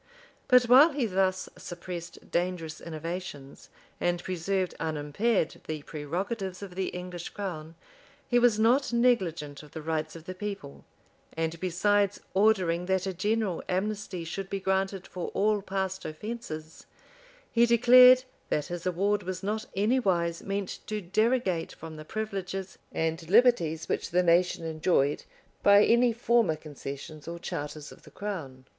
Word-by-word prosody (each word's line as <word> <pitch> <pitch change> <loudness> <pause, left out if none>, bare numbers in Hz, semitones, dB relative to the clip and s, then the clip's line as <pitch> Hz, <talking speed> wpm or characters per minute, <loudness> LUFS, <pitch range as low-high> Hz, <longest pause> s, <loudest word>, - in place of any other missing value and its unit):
But 250 -1 +7
while 265 +6 +7
he 275 -4 0
thus 190 -2 0
suppressed 175 -1 -8
dangerous 170 -3 -2
innovations, 160 -3 -7 0.3
and 175 0 0
preserved 185 +1 -1
unimpaired 160 +6 -1
the 155 -2 -4
prerogatives 185 +7 -4
of 190 -3 -8
the 190 +1 -2
English 180 -1 -6
crown, 165 -5 -6 0.5
he 245 - +3
was 240 -3 +4
not 240 +6 +3
negligent 185 - +1
of 150 -1 -16
the 160 - -6
rights 155 0 -2
of 165 -1 -10
the 185 - -5
people; 185 - -7 0.5
and 165 0 -2
besides 200 +3 +1
ordering 185 -4 +2
that 190 -1 +1
a 190 - -2
general 205 0 0
amnesty 195 -1 -2
should 190 +4 -5
be 195 - -2
granted 190 0 -1
for 180 - -5
all 210 +1 +2
past 190 -1 -3
offences, 160 -3 -7 0.6
he 235 0 +4
declared, 250 +2 +8 0.3
that 150 - 0
his 175 0 -5
award 200 +3 +1
was 185 0 -5
not 215 +2 -2
anywise 190 -6 +1
meant 200 -1 -3
to 215 0 -2
derogate 210 -2 0
from 160 0 -9
the 155 - -9
privileges 195 -2 -4
and 160 0 -2
liberties 185 -8 +4
which - - -2
the 180 +1 +2
nation 170 0 +3
enjoyed 155 -3 +1 0.4
by 200 0 +7
any 235 +1 +4
former 235 -6 +2
concessions 150 0 -8
or 170 0 -5
charters 150 -2 -6
of - - -14
the - - -15
crown. 155 -11 -6
185 Hz, 145 wpm, -28 LUFS, 165-210 Hz, 0.6 s, declared